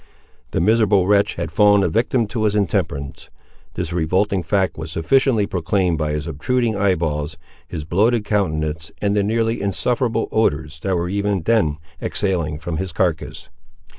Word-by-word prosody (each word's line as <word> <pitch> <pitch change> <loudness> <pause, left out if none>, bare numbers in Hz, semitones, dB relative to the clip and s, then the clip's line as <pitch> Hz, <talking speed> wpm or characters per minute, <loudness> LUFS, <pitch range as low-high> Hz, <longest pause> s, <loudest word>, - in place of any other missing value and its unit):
The - - -1
miserable 105 0 +3
wretch 100 +1 +2
had 85 -2 -4
fallen 105 +3 +5
a - - +2
victim 115 +6 +1
to 110 -2 -1
his 105 -1 +1
intemperance. 70 -8 -2 0.5
This 85 -1 -3
revolting 95 +4 +1
fact 95 +3 0
was - - -6
sufficiently 115 - +2
proclaimed 90 -2 0
by 75 -1 -1
his 75 0 -3
obtruding 115 - -1
eye 100 -2 +2
balls, 75 -2 -3 0.3
his 80 - -5
bloated 105 +6 +2
countenance, 80 -6 -1
and 100 0 0
the 105 - +3
nearly 115 +2 0
insufferable 115 +6 0
odours 75 -7 0
that 95 +3 -1
were 85 0 -1
even 100 -1 -1
then 95 -10 +2 0.2
exhaling 85 -7 -1
from 80 +1 -4
his 95 +1 -3
carcass. 85 -1 -2
95 Hz, 160 wpm, -20 LUFS, 80-105 Hz, 0.5 s, fallen